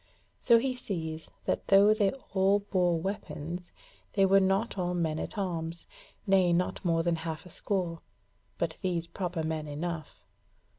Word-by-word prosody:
So 235 Hz, -2 st, +6 dB
he 255 Hz, +2 st, 0 dB
sees 160 Hz, -9 st, -4 dB, 0.2 s
that -, -, -1 dB
though 200 Hz, +2 st, +7 dB
they 205 Hz, -3 st, +2 dB, 0.2 s
all 195 Hz, +1 st, +4 dB
bore 180 Hz, -4 st, +1 dB
weapons, 175 Hz, -2 st, -5 dB, 0.4 s
they 195 Hz, -1 st, +4 dB
were 195 Hz, +1 st, +6 dB
not 195 Hz, +4 st, +1 dB
all 180 Hz, -2 st, -1 dB
men 160 Hz, -3 st, 0 dB
at -, -, -5 dB
arms, 170 Hz, -3 st, -1 dB, 0.4 s
nay, 190 Hz, -3 st, +4 dB
not 180 Hz, +1 st, 0 dB
more 165 Hz, -2 st, +2 dB
than 170 Hz, -1 st, +1 dB
a -, -, -8 dB
half 160 Hz, +1 st, -5 dB
score, 175 Hz, -4 st, -2 dB, 0.6 s
but 165 Hz, -2 st, -2 dB
those 175 Hz, -3 st, -1 dB
proper 170 Hz, -1 st, -3 dB
men 155 Hz, -1 st, -2 dB
enough. 155 Hz, +1 st, -5 dB
175 Hz, 155 wpm, -30 LUFS, 165-195 Hz, 0.6 s, though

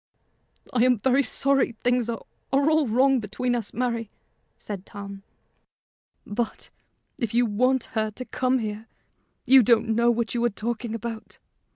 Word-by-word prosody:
"I 245 Hz, -2 st, +3 dB
am 250 Hz, -1 st, +4 dB
very 260 Hz, +6 st, +3 dB
sorry 275 Hz, -2 st, +1 dB
things 245 Hz, -1 st, +1 dB
are 230 Hz, -, -4 dB, 0.3 s
all 290 Hz, +2 st, +3 dB
wrong 260 Hz, +4 st, +3 dB
between 230 Hz, +4 st, -2 dB
us, 235 Hz, -4 st, -3 dB
Mary," 235 Hz, -2 st, -2 dB, 0.5 s
said 200 Hz, -3 st, -7 dB
Tom. 200 Hz, -1 st, -9 dB, 1.0 s
"But, 225 Hz, +3 st, -4 dB, 0.5 s
if 235 Hz, -4 st, -2 dB
you 240 Hz, +1 st, +4 dB
want 250 Hz, +4 st, +1 dB
her 220 Hz, -1 st, 0 dB
to 255 Hz, +4 st, -8 dB
come 255 Hz, +1 st, 0 dB
here, 215 Hz, -1 st, -5 dB, 0.6 s
you 265 Hz, 0 st, +8 dB
don't 230 Hz, -1 st, +3 dB
know 235 Hz, +2 st, +3 dB
what 235 Hz, -1 st, 0 dB
you 240 Hz, -1 st, 0 dB
are 240 Hz, -, +3 dB
talking 230 Hz, +2 st, -4 dB
about. 230 Hz, 0 st, -6 dB
235 Hz, 150 wpm, -25 LUFS, 220-255 Hz, 1.0 s, you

